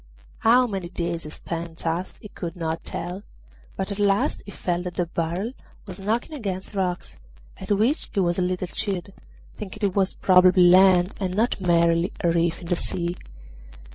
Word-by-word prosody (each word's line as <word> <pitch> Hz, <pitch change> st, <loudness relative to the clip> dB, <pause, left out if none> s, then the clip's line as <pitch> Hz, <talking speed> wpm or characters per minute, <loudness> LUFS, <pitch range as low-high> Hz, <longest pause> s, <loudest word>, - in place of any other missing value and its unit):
How 245 Hz, +3 st, +5 dB
many 195 Hz, -6 st, -4 dB
days 170 Hz, -2 st, -3 dB
he -, -, -6 dB
spent 165 Hz, +1 st, -6 dB
thus 165 Hz, +3 st, -3 dB
he 210 Hz, -, -11 dB
could 170 Hz, -4 st, -6 dB
not 165 Hz, -2 st, -3 dB
tell, 175 Hz, +3 st, -5 dB, 0.5 s
but 190 Hz, +1 st, -3 dB
at 200 Hz, -, -4 dB
last 200 Hz, 0 st, +2 dB
he -, -, -7 dB
felt 175 Hz, -2 st, -2 dB
that 180 Hz, -, -5 dB
the 175 Hz, -, 0 dB
barrel 170 Hz, +6 st, -2 dB, 0.3 s
was 190 Hz, -2 st, -8 dB
knocking 225 Hz, +9 st, -1 dB
against 195 Hz, -7 st, -4 dB
rocks, 185 Hz, -3 st, -2 dB, 0.4 s
at -, -, -9 dB
which 220 Hz, +9 st, +1 dB
he 205 Hz, -, -1 dB
was 175 Hz, -1 st, +1 dB
a -, -, +2 dB
little 180 Hz, 0 st, -1 dB
cheered, 195 Hz, 0 st, -4 dB, 0.4 s
thinking 210 Hz, 0 st, -2 dB
it 190 Hz, -, -5 dB
was 195 Hz, -1 st, +2 dB
probably 185 Hz, 0 st, +5 dB
land 180 Hz, 0 st, +6 dB
and 185 Hz, -2 st, -2 dB
not 220 Hz, -1 st, +1 dB
merely 170 Hz, 0 st, +3 dB
a 170 Hz, -, +3 dB
reef 170 Hz, 0 st, +1 dB
in -, -, -9 dB
the 175 Hz, +1 st, +1 dB
sea. 175 Hz, 0 st, -1 dB
180 Hz, 180 wpm, -24 LUFS, 170-200 Hz, 0.5 s, land